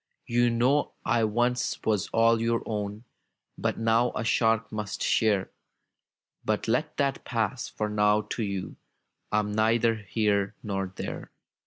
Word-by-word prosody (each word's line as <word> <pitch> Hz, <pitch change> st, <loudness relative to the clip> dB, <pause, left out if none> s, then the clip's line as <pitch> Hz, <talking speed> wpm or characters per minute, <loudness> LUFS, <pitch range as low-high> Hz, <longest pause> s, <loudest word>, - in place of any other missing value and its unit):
"You 120 Hz, 0 st, +2 dB
know 125 Hz, +5 st, +2 dB
I 120 Hz, -3 st, +2 dB
once 120 Hz, +3 st, 0 dB
was 105 Hz, -2 st, +1 dB
all 115 Hz, 0 st, +4 dB
your 115 Hz, 0 st, +1 dB
own. 105 Hz, 0 st, -4 dB, 0.5 s
But -, -, -1 dB
now 115 Hz, +2 st, +2 dB
a -, -, -1 dB
shark 115 Hz, -1 st, +2 dB
must 105 Hz, -2 st, -4 dB
share! 105 Hz, -4 st, +2 dB, 0.9 s
But 110 Hz, +1 st, -1 dB
let 125 Hz, +7 st, 0 dB
that 140 Hz, -2 st, 0 dB
pass 115 Hz, 0 st, -2 dB
— -, -, -33 dB
^for 105 Hz, -, 0 dB
now 105 Hz, 0 st, +3 dB
to 115 Hz, -, -4 dB
you 100 Hz, -3 st, -3 dB, 0.5 s
I'm 105 Hz, 0 st, +1 dB
neither 115 Hz, +2 st, +3 dB
here 105 Hz, -1 st, 0 dB
nor 95 Hz, -3 st, -3 dB
there. -, -, -6 dB
110 Hz, 145 wpm, -27 LUFS, 105-115 Hz, 0.9 s, all